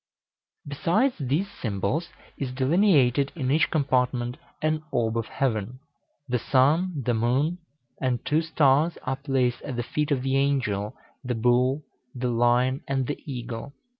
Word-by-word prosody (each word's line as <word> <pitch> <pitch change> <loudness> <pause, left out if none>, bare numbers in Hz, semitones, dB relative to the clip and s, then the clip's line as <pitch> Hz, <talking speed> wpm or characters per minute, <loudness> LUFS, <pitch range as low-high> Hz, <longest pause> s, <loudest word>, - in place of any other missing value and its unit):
Besides 180 - +1
these 145 +8 0
symbols 110 - -1 0.3
is 135 -3 -4
delineated 140 - +3
in 135 -5 -1
each 155 +3 +3
compartment 125 -4 0 0.2
an 155 0 0
orb 115 -2 0
of 115 -1 -1
heaven. 120 -2 -2 0.5
The 125 -1 0
sun, 150 +5 +2
the 120 - +2
moon, 130 +10 +1 0.4
and 125 -3 -1
two 155 +2 +2
stars, 155 0 +2
are 130 0 -2
placed 135 -3 0
at 130 - -5
the 120 - -2
feet 150 +5 -2
of 135 -4 0
the 135 0 +1
Angel, 115 -8 0 0.3
the 125 -1 -2
Bull, 125 +5 +2 0.3
the 125 0 -1
Lion, 120 +3 +2
and 135 -1 0
the 145 - -4
Eagle. 120 +1 -6
130 Hz, 145 wpm, -26 LUFS, 120-145 Hz, 0.5 s, delineated